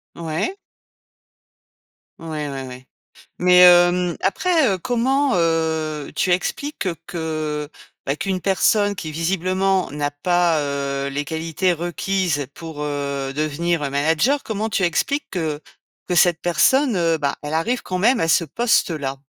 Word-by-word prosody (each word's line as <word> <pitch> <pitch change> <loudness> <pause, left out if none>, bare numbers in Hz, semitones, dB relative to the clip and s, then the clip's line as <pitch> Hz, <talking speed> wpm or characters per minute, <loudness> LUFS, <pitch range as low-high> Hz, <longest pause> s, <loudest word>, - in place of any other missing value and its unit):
Ouais. 170 - -3 1.6
Ouais, 165 - -9 0.2
ouais, 135 -1 -6
ouais. 130 0 -10 0.5
Mais, 180 0 +5
hem, 175 0 +6
après, 320 - +2
heu, - - -2
comment, 260 +5 +1
heu, 160 -3 -1
tu 185 - +1
expliques 200 +6 -2 0.2
que, 155 -3 -4 0.4
bah, 135 - 0
qu'une 185 +3 -3
personne 205 +2 +2
qui 160 -4 -6
visiblement 185 +3 0
n'a 145 0 -2
pas, 170 +2 +1
heu, 140 -1 -2
les 140 +1 -3
qualités 165 +4 -1
requises 175 -3 -1
pour, 160 -3 -8
heu, 140 -2 -3
devenir 155 +3 -1
manager, 160 - +2
comment 220 0 -3
tu 195 - 0
expliques 280 - 0
que 160 -5 -3 0.5
que 180 - -1
cette 175 -1 +4
personne, 235 - +3
heu, 165 -2 +2
bah, 145 -2 -1
elle 145 - -5
arrive 230 +11 0
quand 185 - -3
même 235 +5 +3
à 165 - +1
ce 165 +1 +3
poste-là? 155 - 0
170 Hz, 135 wpm, -21 LUFS, 150-190 Hz, 1.6 s, hem